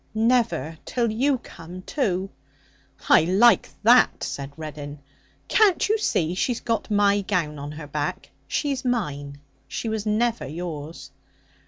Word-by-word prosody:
'Never! 225 - +1
till 235 -3 -1
you 265 +5 +2
come, 180 -5 -11
too.' 195 -9 -1 0.8
'I - - +6
like 195 +4 +5
that,' 240 +2 +5
said 140 0 -4
Reddin. 150 -2 -7 0.5
'Can't 410 -3 +3
you 435 +1 +2
see 170 - 0
she's 230 +6 -1
got 230 -1 -2
my 205 -1 +3
gown 170 -7 -1
on 145 +1 -6
her 150 0 -8
back? 145 0 -4 0.2
She's 275 -4 -1
mine. 145 - -2 0.3
She 230 - -4
was 220 -1 -3
never 225 - 0
yours.' 160 0 -7
195 Hz, 135 wpm, -24 LUFS, 155-235 Hz, 0.8 s, I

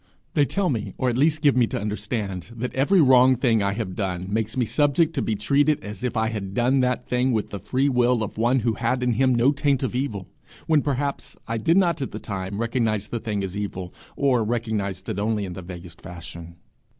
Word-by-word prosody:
They 145 - +4
tell 195 +4 0
me, 110 -7 -3
or 130 - +1
at 120 - -2
least 155 +1 +2
give 145 -3 +5
me 125 -2 +4
to - - -3
understand, 105 -3 -4
that 125 +2 -4
every 145 +9 +3
wrong 130 -2 +6
thing 120 -3 +2
I 100 0 +1
have 100 -4 -4
done 90 -3 -2
makes 110 +1 -1
me 125 - +2
subject 150 +6 +2
to - - -1
be 110 - -1
treated 145 +8 +2
as 105 +3 -7
if 125 -1 -2
I 110 0 +1
had 100 -3 -5
done 125 +3 +3
that 125 -1 0
thing 125 +1 +1
with 110 -2 -1
the 100 - -5
free 130 +8 0
will 125 -3 +2
of 105 - -5
one 120 +3 +2
who 115 0 +1
had 125 +3 -1
in 125 - +2
him 130 +2 +3
no 120 +4 +4
taint 140 -2 0
of 130 - -1
evil 115 -8 -3 0.4
when, 155 -2 +3
perhaps, 140 0 -3
I 115 0 -2
did 165 - +3
not 170 -5 +2
at 135 - -4
the - - -5
time 95 -1 -5
recognize 115 -3 -1
the 120 - -3
thing 105 -3 -3
as 95 0 -4
evil, 95 -3 -5 0.2
or 130 -5 +2
recognized 105 -4 -2
it 100 - -3
only 105 -1 0
in 90 - -6
the 95 - -7
vaguest 85 -1 -10
fashion. 85 -1 -10
115 Hz, 230 wpm, -24 LUFS, 100-130 Hz, 0.4 s, wrong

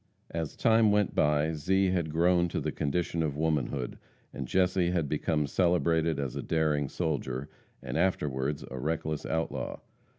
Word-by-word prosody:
As 80 -2 -3
time 115 -1 +4
went 105 -2 +2
by, 75 +2 +2
Zee 95 +5 +2
had 85 -4 0
grown 85 +2 +3
to - - -2
the - - -2
condition 85 +3 -1
of 75 -3 -1
womanhood, 75 -5 -1 0.3
and 70 - -5
Jesse 90 0 +2
had 85 -4 0
become 75 +1 0
celebrated 85 0 +2
as 70 -3 -3
a - - -2
daring 75 -3 +1
soldier, 70 -5 -2 0.4
and - - -5
afterwards 70 -6 0
a 65 - -5
reckless 80 +1 -2
outlaw. 80 0 -2
80 Hz, 155 wpm, -29 LUFS, 75-90 Hz, 0.4 s, time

